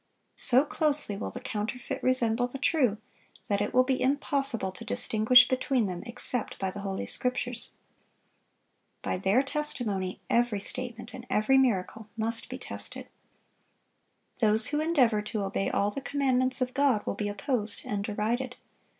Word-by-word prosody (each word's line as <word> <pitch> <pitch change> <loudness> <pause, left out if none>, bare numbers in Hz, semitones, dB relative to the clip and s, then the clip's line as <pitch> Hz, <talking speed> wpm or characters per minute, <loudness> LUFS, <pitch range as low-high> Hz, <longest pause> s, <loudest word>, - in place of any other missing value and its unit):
So 260 +3 +7
closely 295 -8 +1
will 200 - -4
the - - -8
counterfeit 250 0 -4
resemble 245 -2 +2
the 250 - -8
true, 260 -6 +1 0.5
that 200 -1 0
it 205 - -1
will 255 - +4
be 255 0 -1
impossible 270 -5 +1
to 185 - -10
distinguish 220 - +4
between 255 -2 0
them 180 -2 -4
except 235 0 -3
by 190 -1 -2
the 205 - -8
Holy 195 -1 -4
Scriptures. 250 -1 -1 1.3
By - - -2
their 195 +8 +2
testimony 235 -10 -2
every 235 -3 +1
statement 240 +2 -4
and 250 0 -10
every 265 +6 +3
miracle 220 -3 0
must 225 +1 -2
be - - -6
tested. - - -6 1.3
Those 220 -1 +3
who 295 - -1
endeavor 260 -10 +2
to 210 0 -4
obey 195 0 -1
all 205 +1 0
the 275 - -6
commandments 260 -2 +1
of 255 0 -1
God 270 -6 +2
will - - -2
be 205 -1 -3
opposed 210 +1 -1
and 205 -1 -3
derided. 230 +5 -2
240 Hz, 150 wpm, -28 LUFS, 210-260 Hz, 1.3 s, So